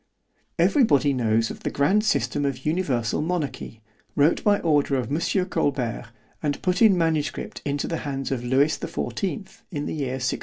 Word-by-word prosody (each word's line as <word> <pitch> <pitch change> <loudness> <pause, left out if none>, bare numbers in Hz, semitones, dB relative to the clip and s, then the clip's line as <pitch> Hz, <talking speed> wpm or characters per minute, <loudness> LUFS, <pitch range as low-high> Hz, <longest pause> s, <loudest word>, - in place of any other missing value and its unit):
Every 290 - +4
body 145 - +3
knows 115 -2 +1
of - - -9
the - - -3
grand 190 +10 +2
system 145 -8 0
of 135 -2 -3
Universal 145 -8 0
Monarchy, 150 -9 -3 0.3
wrote 145 +3 +3
by 205 -1 +4
order 145 -4 +2
of 125 -2 -2
Mons. 155 +4 0 0.2
Colbert, 125 -6 -1 0.3
and 145 -2 -1
put 180 +2 +1
in 210 -5 +6
manuscript 160 -3 -1
into 145 0 -1
the 165 - -2
hands 135 -3 -4
of 125 -3 -2
Lewis 135 +5 +2
the - - -5
fourteenth, 195 0 -4
in 145 -4 -4
the - - -3
year 135 -4 -2
1664. 125 -1 -1
145 Hz, 180 wpm, -24 LUFS, 130-170 Hz, 0.3 s, in